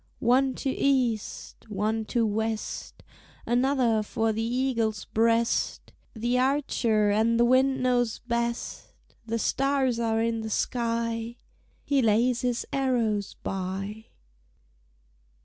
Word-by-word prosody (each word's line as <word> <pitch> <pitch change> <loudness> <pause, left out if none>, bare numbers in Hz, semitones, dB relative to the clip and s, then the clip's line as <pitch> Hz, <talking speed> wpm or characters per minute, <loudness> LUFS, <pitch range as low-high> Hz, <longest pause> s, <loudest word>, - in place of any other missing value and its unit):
One 260 +2 +2
to 275 - -2
east, 250 -6 -1
one 215 +2 -1
to 230 +1 +1
west, 220 +1 -3 0.4
Another 245 -2 +2
for 225 +1 -1
the 220 - -2
eagle's 230 -3 -1
breast, 230 +1 0 0.2
The 240 +3 0
archer 240 -6 +2
and 225 +3 +2
the 240 - +5
wind 260 +1 +3
know 250 -1 +3 0.2
best!" 235 0 -3 0.3
The 230 +1 -1
stars 270 0 +1
are 225 -1 +1
in 225 0 0
the 220 - -5
sky; 230 0 -1 0.5
He 280 -2 +2
lays 230 +2 +2
his 245 -1 -1
arrows 235 -7 0
by. 195 +3 -4
230 Hz, 115 wpm, -27 LUFS, 220-250 Hz, 0.5 s, the